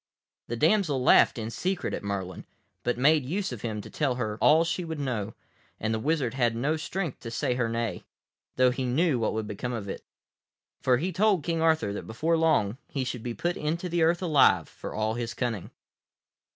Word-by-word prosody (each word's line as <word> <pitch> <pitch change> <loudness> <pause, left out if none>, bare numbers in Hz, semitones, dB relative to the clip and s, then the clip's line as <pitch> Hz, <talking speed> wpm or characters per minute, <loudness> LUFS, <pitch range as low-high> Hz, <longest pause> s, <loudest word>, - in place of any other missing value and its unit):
The 120 - -3
damsel 155 - +2
laughed - - +5
in 115 0 -4
secret 185 +7 -2
at - - -3
Merlin, 95 -2 -4 0.3
but 120 - -1
made 150 +3 +4
use 185 +8 -2
of 120 -4 -6
him 110 -3 -3
to - - -11
tell 140 -5 0
her 110 -3 -3
all 160 +2 +6
she 170 +2 -2
would 160 -2 -5
know, 115 -6 -3 0.4
and 110 +1 -1
the 110 - -1
wizard 140 -3 0
had 120 -3 +1
no 140 +7 0
strength 165 -1 -4
to 115 - -7
say 120 +2 -1
her 125 -2 0
nay, 115 -5 -2 0.5
though 130 0 +4
he 130 +1 -3
knew 130 +2 +2
what 110 - 0
would 105 -2 -3
come 125 0 -3
of 110 -4 -4
it. 95 - -6 0.8
For 125 -1 +3
he 175 +8 -2
told 190 -2 +2
King 165 0 -1
Arthur 160 -11 +2
that - - -6
before 155 +10 0
long 140 -9 +2
he 135 - -2
should 125 -2 -4
be 120 0 -4
put 175 +1 -1
into 165 +4 -2
the 170 0 0
earth 170 +3 +3
alive, 155 -6 +4
for - - -8
all 110 +1 0
his 115 0 -4
cunning. 115 -6 -3
125 Hz, 205 wpm, -27 LUFS, 115-160 Hz, 0.8 s, all